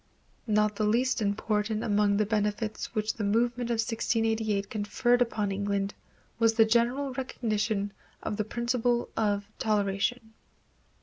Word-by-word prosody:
Not 210 -1 +2
the 215 - 0
least 240 +3 +2
important 210 +1 0
among 205 -1 +2
the 215 - +2
benefits 210 +1 -2
which 215 0 0
the 220 - -4
movement 235 +3 +1
of 235 - +1
1688 225 -2 0
conferred 240 +3 +1
upon 215 -4 0
England 200 0 -1 0.5
was 225 -1 +4
the 225 -1 +6
general 240 +5 +1
recognition 215 -5 -2 0.3
of 205 - -3
the 215 - +1
principle 240 +2 0
of 205 -2 0
toleration. 215 +2 0
220 Hz, 130 wpm, -28 LUFS, 205-235 Hz, 0.5 s, the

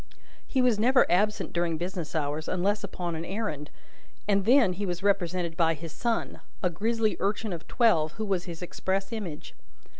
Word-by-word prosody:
He 260 -2 +2
was 240 -4 +3
never 255 +4 +5
absent 210 +4 +1
during 170 -2 0
business 175 -2 -4
hours, 150 0 -1
unless 200 +3 0
upon 180 -3 -4
an 160 - -4
errand, 170 -7 -3 0.6
and 200 -2 +2
then 235 -5 +5
he 200 +3 -4
was 180 +1 -3
represented 180 -4 +1
by 165 -1 +3
his 165 +1 -8
son: 235 +6 -2 0.2
a 180 - +2
grisly 220 +5 0
urchin 205 +1 -1
of 165 - -7
twelve, 165 -11 +3
who 220 - -4
was 190 -3 0
his 170 0 -7
express 195 +3 -2
image. 185 -9 -6
185 Hz, 175 wpm, -28 LUFS, 170-210 Hz, 0.6 s, never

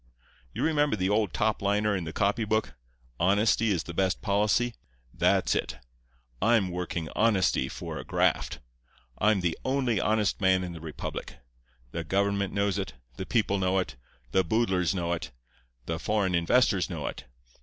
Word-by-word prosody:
You - - -3
remember 150 -4 +2
the 95 -1 0
old 105 -3 +2
top 105 +8 0
liner 105 +1 +1
in 90 -3 -3
the 80 - -5
copy 100 +6 +1
book—"Honesty 95 - 0
is 90 -5 +1
the 85 - -7
Best 95 +1 +1
Policy"? 105 +4 +1 0.4
That's - - +2
it. - - -2 0.6
I'm 110 -5 +3
working 90 -1 -3
honesty 95 - +2
for - - -6
a - - -6
graft. - - +1 0.6
I'm 105 -2 +3
the 85 -2 0
only 130 -5 +1
honest 105 -1 +1
man 95 -1 +3
in 90 -1 -5
the 80 - -9
republic. 80 -5 -6 0.6
The 85 - -3
government 100 +3 0
knows 100 0 0
it; 95 - -4 0.2
the 95 - -5
people 105 -4 +1
know 95 0 +1
it; 65 -9 -2 0.4
the 95 - +3
boodlers 95 -2 +1
know 85 -1 -1
it; 85 - -4 0.6
the 80 0 -3
foreign 100 0 0
investors 90 +2 +3
know 80 -5 -4
it. 65 - -5
95 Hz, 160 wpm, -28 LUFS, 85-105 Hz, 0.6 s, I'm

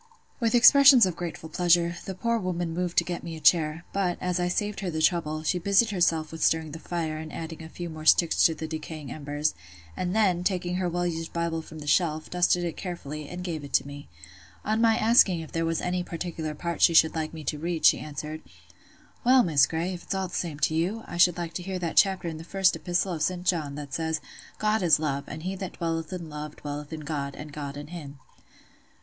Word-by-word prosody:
With 230 -1 +1
expressions 265 -1 +8
of 180 -3 -2
grateful 170 -2 -6
pleasure, 170 0 +2
the 190 - -5
poor 235 +4 0
woman 175 -3 -2
moved 175 0 -3
to - - +6
get 175 -1 -4
me 165 -1 -7
a - - -8
chair; 155 +1 +3
but, 185 -3 0
as 180 0 -1
I 175 - +1
saved 205 +3 -2
her 195 -2 -3
the 160 -2 -3
trouble, 155 -2 +1
she 180 +3 0
busied 200 +5 +3
herself 165 -4 +1
with 160 - -4
stirring 160 -1 +2
the 160 - -7
fire, 160 -2 -3
and 155 0 -7
adding 165 0 -7
a 160 - -9
few 175 +1 -6
more 155 -1 -8
sticks 165 +1 +4
to 165 - +4
the 160 +1 -5
decaying 155 -3 -7
embers; 145 +1 -2 0.4
and 180 +2 -2
then, 185 -5 +2
taking 180 -1 -1
her 185 -1 0
well 175 +1 -1
used 165 -1 -4
Bible 170 -1 -1
from 160 0 -12
the 150 - -8
shelf, 155 0 +1
dusted 180 0 +2
it 170 -2 -4
carefully, 155 -5 -6
and 180 0 -6
gave 165 -4 -4
it 140 - +1
me. 145 0 -10 0.6
On 220 +1 +1
my 225 -1 +4
asking 215 -6 +4
if 160 - -10
there 165 0 -1
was 165 0 -1
any 180 0 -1
particular 165 -3 -5
part 170 +2 -4
she 170 - +5
should 160 0 +6
like 160 -1 -3
me 160 -1 -8
to 150 +1 -3
read, 170 0 -2
she - - +6
answered— 155 +1 -6 0.8
"Well, 255 +1 +6
Miss 145 -7 +4
Grey, 165 +3 -2
if 175 - -7
it's - - -4
all 190 -1 -2
the - - -15
same 165 -5 -3
to - - +2
you, 185 +8 -1
I 175 - -7
should 175 0 +5
like 170 -1 -4
to 180 - -4
hear 190 +1 -4
that 170 -2 -3
chapter 190 -3 +4
in 160 -1 -4
the - - -8
First 190 +2 +2
Epistle 175 +1 -1
of 160 - -5
St. 180 +3 -1
John, 155 -6 0
that 145 -2 -8
says, 160 -1 -1 0.4
'God 215 +1 +1
is 165 -4 +5
love, 140 -3 -2
and 155 +1 -7
he 190 +2 -3
that 190 -1 -6
dwelleth 165 0 -3
in 175 -3 -5
love 150 0 -7
dwelleth 145 0 -7
in 160 -1 -6
God, 140 -2 -4
and 150 -1 -9
God 145 -1 -6
in 145 +1 -8
him. 150 -5 -8
170 Hz, 235 wpm, -27 LUFS, 155-180 Hz, 0.8 s, expressions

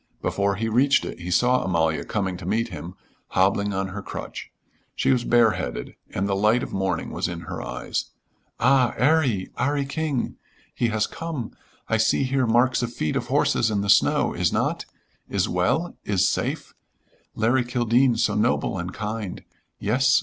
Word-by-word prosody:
Before 100 0 0
he 115 +3 -2
reached 130 +5 +3
it - - -7
he 90 +1 -6
saw 125 +7 +3
Amalia 80 -4 +1
coming 95 -4 -2
to 95 - -9
meet 115 +1 0
him, 90 -1 -8 0.3
hobbling 100 +2 +2
on 95 0 -2
her 100 +2 -6
crutch. - - -7 0.4
She - - +2
was 125 -2 +2
bareheaded 115 - +1 0.2
and 95 +2 -2
the 100 - 0
light 105 +5 +3
of - - -6
morning 95 -3 -1
was - - -1
in 85 -1 -5
her - - -6
eyes. - - -3 0.5
"Ah, 130 -2 +3
'Arry, 130 -9 +2
'Arry 145 0 +1
King! 145 -2 -2 0.4
He 120 - 0
has 110 -1 +1
come. 155 -9 -5 0.4
I 110 - +2
see 110 +5 +2
here 130 -1 +1
marks 120 +3 +3
of 120 -1 -2
feet 75 -10 -2
of - - -2
horses 115 - +2
in 105 -2 0
the 100 0 +3
snow - - +3
is - - +1
not? - - -1 0.4
Is - - +1
well? 95 - 0
Is 95 -2 +2
safe? - - -2 0.6
Larry 120 +4 +2
Kildene 120 0 +2
so 115 - +2
noble 105 -3 +1
and 90 +1 -4
kind! 105 -2 -5 0.3
Yes. 130 +6 +3
110 Hz, 170 wpm, -24 LUFS, 95-125 Hz, 0.6 s, reached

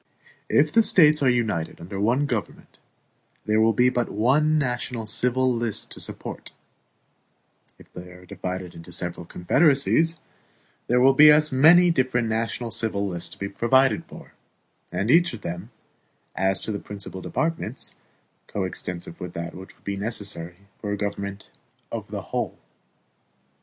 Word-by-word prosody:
If - - +3
the 230 - +6
States 155 -8 +5
are 135 - +4
united 110 -10 -1
under 95 +4 -7
one 120 +7 +2
government, 120 -7 -5 0.7
there 110 +1 +2
will 110 +1 +4
be 125 +3 +3
but 120 -2 -1
one 145 +8 +2
national 125 -4 -2
civil 125 +3 +1
list 115 -2 -3
to - - -5
support; - - -6 1.3
if - - -19
they 90 0 -9
are 90 0 -14
divided 90 -1 -6
into 85 +1 -11
several 85 0 -3
confederacies, 150 - +3 0.7
there 125 +1 +3
will 135 +2 +6
be 150 +3 +8
as 150 0 +5
many 170 +7 +6
different 130 -5 0
national 115 +1 -2
civil 100 -3 -1
lists 85 -3 -4
to - - -12
be 100 - -4
provided 130 +6 +2
for - - -13 0.6
and 105 +5 0
each 170 0 +4
of 110 - -12
them, 90 +5 -6 0.7
as 95 0 +1
to - - -3
the 100 - -3
principal 100 -2 -8
departments, 165 - -3 0.5
coextensive 90 -3 -4
with 90 -1 -6
that 85 0 -5
which 95 +1 -11
would - - -30
be 100 0 -3
necessary 100 -4 -3 0.2
for 105 - -4
a 105 - -2
government 100 0 -5 0.4
of - - -5
the - - -5
whole. - - -2
110 Hz, 150 wpm, -24 LUFS, 95-130 Hz, 1.3 s, be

